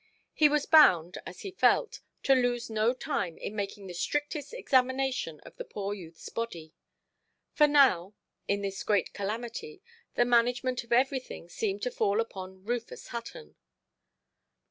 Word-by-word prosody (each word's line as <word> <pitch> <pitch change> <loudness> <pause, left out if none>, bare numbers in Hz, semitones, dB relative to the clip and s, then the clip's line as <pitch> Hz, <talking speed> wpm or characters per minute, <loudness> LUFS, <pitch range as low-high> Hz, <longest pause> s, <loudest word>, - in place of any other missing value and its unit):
He 305 -1 +5
was 295 0 +1
bound, 185 - +6
as 180 - -9
he 390 - -6
felt, 440 +4 +2 0.2
to 270 - +5
lose 245 -3 +1
no 220 +2 +2
time 225 - -3
in 210 - -6
making 200 -1 -4
the 180 - -7
strictest 295 - -2
examination 260 - 0
of - - -15
the - - -5
poor 200 0 -4
youthʼs 165 -4 -11
body. 170 -9 -5 0.8
For 300 - +5
now, 230 -10 +4 0.3
in 200 0 0
this 195 -1 -3
great 205 -4 +1
calamity, 240 - -5 0.3
the 240 - +4
management 245 +1 +2
of 235 - -22
everything 255 -7 0
seemed 200 +2 -3
to 250 - -1
fall 210 -2 +1
upon 190 -4 -5
Rufus 235 0 -4
Hutton. 240 - -8
235 Hz, 145 wpm, -29 LUFS, 195-265 Hz, 0.8 s, bound